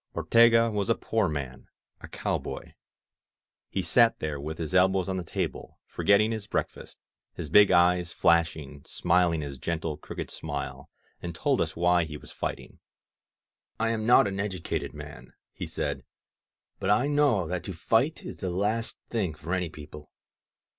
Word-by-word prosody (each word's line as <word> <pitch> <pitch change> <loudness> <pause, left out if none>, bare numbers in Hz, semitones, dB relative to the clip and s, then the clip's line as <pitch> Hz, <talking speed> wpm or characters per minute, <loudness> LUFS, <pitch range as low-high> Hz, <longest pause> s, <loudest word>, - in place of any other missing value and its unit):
Ortega 115 0 +5
was 105 -1 -2
a 115 - +4
poor 110 -5 0
man, 70 -4 -5 0.3
a - - -10
cowboy. - - -4 1.0
He 95 - -2
sat 115 +4 +4
there, 75 -2 -4
with 80 +3 -5
his 80 0 -5
elbows 95 0 +3
on 95 -1 -2
the 90 - -3
table, - - -4
forgetting 105 +2 +3
his 110 -2 -4
break - - 0
fast, - - -13 0.4
his 75 - -6
big 105 +2 +7
eyes 90 0 +3
flashing, 80 -4 +1
smiling 85 -2 +1
his 70 -3 -6
gentle, 80 0 -3
crooked - - -7
smile, 75 -2 -6 0.3
and 85 -1 -6
told - - +1
us - - -2
why 85 0 +3
he 75 -1 -7
was - - -12
fighting. - - -5 1.0
I 115 0 +1
am 110 -1 -2
not 120 - +7
an 100 0 -4
educated 95 -4 -3
man," - - -10 0.2
he - - -6
said. - - -3 0.8
^^But 95 - -1
I 105 +6 +4
know 145 -10 +2
that 90 +1 -3
to 95 - -4
fight 115 - +1
is - - -7
the 95 - -3
last 105 +5 -1
thing 95 -9 -1
for 80 +4 -5
any 90 -2 -1
people. 75 -1 -11
90 Hz, 165 wpm, -27 LUFS, 80-105 Hz, 1.0 s, big